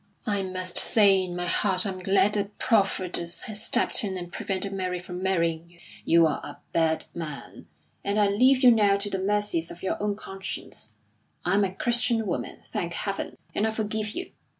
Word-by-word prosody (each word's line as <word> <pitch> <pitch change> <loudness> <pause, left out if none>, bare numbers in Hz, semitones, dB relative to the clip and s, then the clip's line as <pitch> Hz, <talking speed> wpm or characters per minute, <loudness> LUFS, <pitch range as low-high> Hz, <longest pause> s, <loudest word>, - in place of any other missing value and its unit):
"I 200 -2 0
must 185 -1 -2
say 200 -3 +5
in 180 -1 -5
my 175 0 -2
heart 185 +1 +2
I'm 190 -2 -3
glad 195 +2 +3
that 205 0 -1
Providence 185 -6 0
has 215 -1 -3
stepped - - +3
in 190 -2 -2
and 175 -1 -7
prevented 195 +1 -2
Mary 185 -2 -2
from 180 0 -7
marrying 170 -3 0
you. 170 0 -22 0.2
You 165 0 +5
are 155 - -1
a - - -8 0.2
bad 160 -1 +1
man. 155 -4 -8 0.4
And 200 +1 0
I 205 - +5
leave 255 +7 +4
you 250 - +9
now 205 -3 +4
to 200 0 -1
the 190 - -2
mercies 205 -4 0
of 170 - -11
your 190 - -2
own 205 -1 0
conscience; 195 - -6 0.5
I 175 - +1
am 205 +1 +4
a 190 -1 -2
Christian 235 -1 +2
woman, - - -3
thank - - -4
Heaven! - - -4 0.2
and 215 - +1
I - - 0
forgive 215 0 -2
you. 360 0 -5
195 Hz, 195 wpm, -26 LUFS, 180-210 Hz, 0.5 s, you